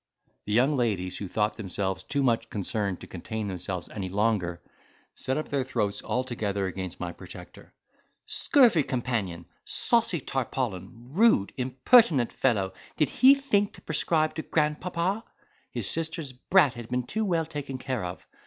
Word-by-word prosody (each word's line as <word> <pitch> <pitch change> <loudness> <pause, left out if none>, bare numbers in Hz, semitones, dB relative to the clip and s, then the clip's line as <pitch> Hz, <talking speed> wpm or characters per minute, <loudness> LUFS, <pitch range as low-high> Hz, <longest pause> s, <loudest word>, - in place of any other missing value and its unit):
The 105 - -4
young 130 +6 +4
ladies, 100 -8 -1
who 100 - -4
thought 105 +2 0
themselves 95 -2 -2
too 140 -2 -1
much 115 -2 +1
concerned 100 -1 -2
to - - -8
contain 110 +4 -5
themselves 90 -1 -4
any 95 -3 -5
longer, 100 -4 0 0.5
set 130 +2 -2
up 155 - -3
their 140 -2 0
throats 105 -6 -1
all 125 - -1
together 105 -6 -2
against 95 -1 -5
my 90 -1 -3
protector—"Scurvy 230 - -1
companion—saucy 125 - -1
tarpaulin—rude, 125 - 0
impertinent 130 - +4
fellow, 100 -7 +1 0.2
did 150 -4 +2
he 265 +2 +7
think 215 -8 +1
to - - -14
prescribe 155 0 +1
to 160 - -3
grandpapa? 170 +7 0 0.5
His - - -2
sister's 160 -4 -2
brat 145 +2 +3
had 120 -2 -8
been 125 0 0
too 220 - -2
well 170 -5 +1
taken 145 -4 -5
care 130 -4 -3
of. 90 +1 -6
125 Hz, 145 wpm, -27 LUFS, 100-155 Hz, 0.5 s, he